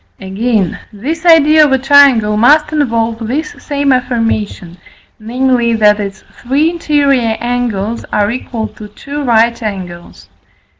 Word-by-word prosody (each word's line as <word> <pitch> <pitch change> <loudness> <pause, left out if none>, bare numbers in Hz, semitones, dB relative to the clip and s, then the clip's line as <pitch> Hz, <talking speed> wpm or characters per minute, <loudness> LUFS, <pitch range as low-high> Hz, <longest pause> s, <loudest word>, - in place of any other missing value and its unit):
Again, 195 0 -2
this 315 - -5
idea 310 -1 +6
of 295 - +2
a 265 - +3
triangle 265 -6 +4
must 300 +8 +3
involve 230 -6 -1
this 300 +6 -3
same 285 -2 0
affirmation, 225 -8 -3 0.4
namely, 240 +1 0
that 210 -1 +3
its 195 -2 -6 0.2
three 285 +6 +1
interior 280 -8 0
angles 235 -3 -3
are 210 0 0
equal 235 -2 -5
to 210 - -12
two 280 +8 -8
right 235 -1 +1
angles. 185 -5 -7
235 Hz, 130 wpm, -13 LUFS, 215-280 Hz, 0.4 s, idea